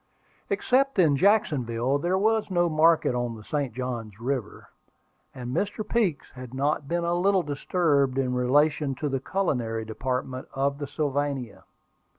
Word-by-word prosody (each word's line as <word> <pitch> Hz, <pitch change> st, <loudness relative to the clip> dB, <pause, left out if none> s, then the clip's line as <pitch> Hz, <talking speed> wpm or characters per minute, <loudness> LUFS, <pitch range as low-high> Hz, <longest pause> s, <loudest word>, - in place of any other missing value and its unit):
Except 270 Hz, +1 st, +1 dB
in 160 Hz, -6 st, +5 dB
Jacksonville, 135 Hz, -, +2 dB
there 175 Hz, +5 st, +1 dB
was 220 Hz, +1 st, +1 dB
no 175 Hz, -2 st, +2 dB
market 160 Hz, -3 st, +3 dB
on 120 Hz, -1 st, -2 dB
the 110 Hz, -, -11 dB
St. 140 Hz, +1 st, -2 dB
Johns 115 Hz, -4 st, -5 dB
River; 125 Hz, -3 st, -4 dB, 0.6 s
and 125 Hz, +1 st, -6 dB
Mr. 205 Hz, +4 st, -2 dB
Peeks 210 Hz, -11 st, 0 dB
had 125 Hz, -1 st, -9 dB
been -, -, -6 dB
not 145 Hz, +2 st, +1 dB
a 170 Hz, 0 st, 0 dB
little 190 Hz, +1 st, +2 dB
disturbed 145 Hz, -2 st, +1 dB
in 130 Hz, -2 st, 0 dB
relation 140 Hz, +3 st, +2 dB
to 150 Hz, +3 st, -3 dB
the 135 Hz, -1 st, -1 dB
culinary 120 Hz, -, -1 dB
department 130 Hz, +3 st, -3 dB
of 140 Hz, +1 st, 0 dB
the 145 Hz, -, -4 dB
Sylvania. 140 Hz, -5 st, -2 dB
140 Hz, 150 wpm, -26 LUFS, 125-175 Hz, 0.6 s, in